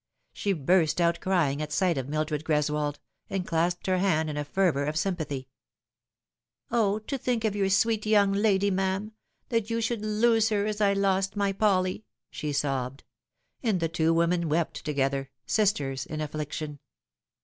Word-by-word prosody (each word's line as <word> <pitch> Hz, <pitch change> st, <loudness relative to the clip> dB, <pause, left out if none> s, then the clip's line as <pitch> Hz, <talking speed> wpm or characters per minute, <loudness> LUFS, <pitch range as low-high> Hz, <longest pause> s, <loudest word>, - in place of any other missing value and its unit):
She 200 Hz, -, -1 dB
burst 165 Hz, +1 st, +2 dB
out 170 Hz, 0 st, +2 dB
crying 160 Hz, -7 st, +1 dB
at 150 Hz, 0 st, -4 dB
sight 180 Hz, +2 st, +2 dB
of 135 Hz, -1 st, -4 dB
Mildred 155 Hz, 0 st, -1 dB
Greswold, 150 Hz, -1 st, 0 dB, 0.3 s
and 190 Hz, -2 st, -2 dB
clasped 175 Hz, +1 st, 0 dB
her 185 Hz, -1 st, +1 dB
hand 160 Hz, -5 st, +1 dB
in -, -, -5 dB
a 150 Hz, -, -1 dB
fervour 145 Hz, -2 st, +1 dB
of 150 Hz, +1 st, -2 dB
sympathy. 155 Hz, -8 st, -2 dB, 0.6 s
" -, -, -46 dB
O, 215 Hz, -3 st, +2 dB
to 260 Hz, +6 st, -5 dB
think 235 Hz, -2 st, -1 dB
of 210 Hz, -2 st, 0 dB
your 195 Hz, -1 st, +1 dB
sweet 215 Hz, +2 st, +2 dB
young 205 Hz, -2 st, +4 dB
lady, 200 Hz, -1 st, +2 dB
ma'am 190 Hz, +1 st, 0 dB
1 215 Hz, -, -10 dB, 0.4 s
that 230 Hz, -2 st, 0 dB
you 230 Hz, 0 st, 0 dB
should 230 Hz, -1 st, -1 dB
lose 220 Hz, +1 st, +3 dB
her, 205 Hz, -2 st, +1 dB
as 215 Hz, 0 st, -2 dB
I 200 Hz, -1 st, +4 dB
lost 195 Hz, 0 st, +1 dB
my 200 Hz, -1 st, +1 dB
Polly 190 Hz, -1 st, +1 dB
!" -, -, -61 dB
she 150 Hz, -1 st, -4 dB
sobbed; 135 Hz, -1 st, -2 dB, 0.6 s
and 220 Hz, -7 st, +1 dB
the 165 Hz, -1 st, 0 dB
two 165 Hz, -1 st, +1 dB
women 170 Hz, 0 st, +2 dB
wept 160 Hz, +2 st, -1 dB
together 135 Hz, -2 st, -1 dB, 0.2 s
sisters 145 Hz, -11 st, 0 dB
in 155 Hz, -, -5 dB
affliction. 150 Hz, 0 st, -4 dB
180 Hz, 175 wpm, -27 LUFS, 150-205 Hz, 0.6 s, young